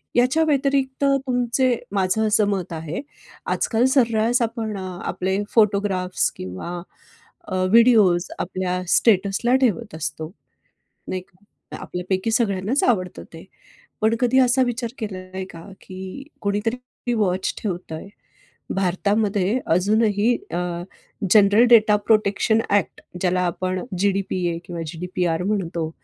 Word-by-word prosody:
याच्या 255 +7 +3
व्यतिरिक्त 275 -2 0 0.2
तुमचे 250 0 +1 0.2
माझं 195 +3 +1
असं 210 -1 +3
मत 185 -4 -2
आहे, 160 - -5 0.5
आजकाल 230 +2 +1
सर्रास 235 0 +3
आपण 225 -2 -3
अ, 190 - -5 0.3
आपले 190 +1 -1 0.2
फोटोग्राफ्स 200 -4 +2
किंवा 95 - -6 0.7
अ, - - -1 0.2
व्हिडिओज 215 -7 +5
आपल्या 180 0 -2
स्टेटस 200 -2 +3
ला 250 +2 +4
ठेवत 230 -5 0
असतो, 160 +1 -5 0.8
नाही 185 -1 -3
का. 190 +2 -15
आपल्यापैकी 185 +4 -2
सगळ्यांनाच 215 +2 +1
आवडतं 185 -7 0
ते. - - -11 0.6
पण 220 +1 +3
कधी 250 +2 +3
असा 255 0 +4
विचार 240 -1 -3
केलाय 190 -3 -6
का? 165 0 -11 0.2
की 190 +8 -8 0.2
कोणीतरी 230 +4 -3
वॉच 190 -4 0
ठेवतय, 175 -4 -5 0.7
भारतामध्ये 200 +3 +1
अजूनही 210 +5 +2 0.2
अ, 175 - -2 0.7
जनरल 210 +2 +6
डेटा-प्रोटेक्शन 215 -1 +4 0.2
एक्ट 190 - -3 0.2
ज्याला 180 0 +1
आपण 185 +1 -2 0.2
जीडीपीए 190 -3 0
किंवा 170 -2 -6
जीडीपीआर 175 +1 -2
म्हणतो 175 -5 -2
200 Hz, 115 wpm, -22 LUFS, 185-230 Hz, 0.8 s, जनरल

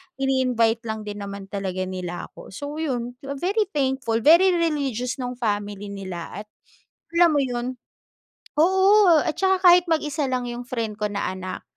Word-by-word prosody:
ini-invite 250 -4 +1
lang 220 -1 -4
din 205 0 -6
naman 200 -1 -7
talaga 190 -2 -3
nila 180 -1 -6
ako. - - -13
So, 290 +2 -6
yun, 245 -6 -2 0.3
very 410 +2 +1
thankful, 260 -5 0
very 350 +4 +6
religious 275 -7 -1
nung 250 0 -4
family 205 -3 -3
nila 190 -2 -6
at - - -36 0.7
alam 345 0 +6
mo 285 - +3
yun 250 0 -3 0.8
oo, 380 +2 +5 0.2
at 310 - 0
saka 380 -1 +3
kahit 355 0 +7
mag-isa 300 -2 0
lang 250 -1 -1
yung 240 0 -5
friend 230 -4 -3
ko 210 - 0
na 200 - -2
anak, 185 0 -6
250 Hz, 160 wpm, -23 LUFS, 205-310 Hz, 0.8 s, kahit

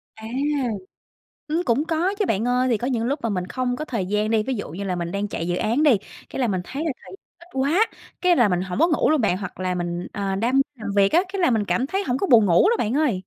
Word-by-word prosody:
À. 220 0 -9 1.2
Ừm, 330 +3 0
cũng 245 +6 +1
có 340 +5 0
chứ 415 - +2
bạn 220 +2 0
ơi, 250 +1 +2
thì 235 - +2
có 245 - -3
những 235 -4 0
lúc 280 +5 -1
mà 230 - 0
mình 180 -3 -2
không 250 +1 -2
có 305 - -4
thời 215 -10 -3
gian 210 +2 0
đi, 220 -1 +3
ví 265 +3 -2
dụ 205 - -5
như 195 +5 -5
là 185 -2 -1
mình 170 0 -3
đang 200 +1 -2
chạy 170 -2 -4
dự 175 - 0
án 235 +10 +1
đi, 280 -8 +6 0.3
cái - - -5
là 245 - +2
mình 185 -3 0
thấy 285 - -5
là 320 - 0
thời - - -13
gian - - -9 0.2
ít 345 +1 -17
quá, 300 +12 +2 0.3
cái 360 -1 +4
là 240 -5 +4
mình 180 -1 +1
hổng 185 +3 -4
có 330 - +5
ngủ 315 - +2
luôn 310 -3 +3
bạn. 195 -4 +2
Hoặc 195 -1 -7
là 185 -1 -1
mình, 175 0 -3
ờ, 195 -1 -2
đam 250 +6 +2
làm 215 -4 -6
việc 195 0 +4
á, 345 +3 +5
cái 390 - -2
là 340 - +4
mình 220 -3 +1
cảm 255 +5 0
thấy 390 +5 -2
hổng 245 -3 -1
có 390 - 0
buồn 225 -6 +6
ngủ 175 - +5
luôn 470 - +3
bạn 225 +3 0
ơi. 295 -7 +2
235 Hz, 295 wpm, -23 LUFS, 200-295 Hz, 1.2 s, đi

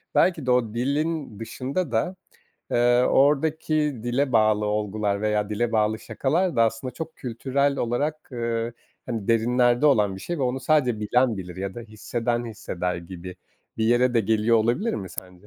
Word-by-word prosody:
belki 170 -7 +3
de 125 - +2
o 115 -3 +2
dilin 140 -1 -2
dışında 130 +7 -3
da, 120 +12 0 0.6
eee, 120 +1 +4
oradaki 150 +3 +2 0.3
dile 125 +2 0
bağlı 110 -1 +3
olgular 105 -1 -1
veya 105 -1 0
dile 115 +2 -1
bağlı 110 0 +2
şakalar 165 +8 -1
da 115 - +5
aslında 115 +3 -1
çok 160 -1 -7
kültürel 135 +3 -1
olarak, 145 +5 -2
ııı, 115 -1 -2 0.3
hani, 115 -5 -4
derinlerde 120 +3 +3
olan 105 -8 +3
bir - - -9
şey 175 -2 -4
ve - - -1
onu 130 +1 -1
sadece 130 -8 +2
bilen 120 +1 +2
bilir 90 -1 -7
ya 95 0 -4
da 120 - -6
hisseden 120 +2 -3
hisseder 90 -5 -3
gibi 90 +1 -9 0.4
bir 110 - 0
yere 120 +2 +3
de 115 - +4
geliyor 110 +2 +2
olabilir 120 - +1
mi 95 -3 -5
sence? 90 +2 -9
120 Hz, 165 wpm, -24 LUFS, 105-135 Hz, 0.6 s, da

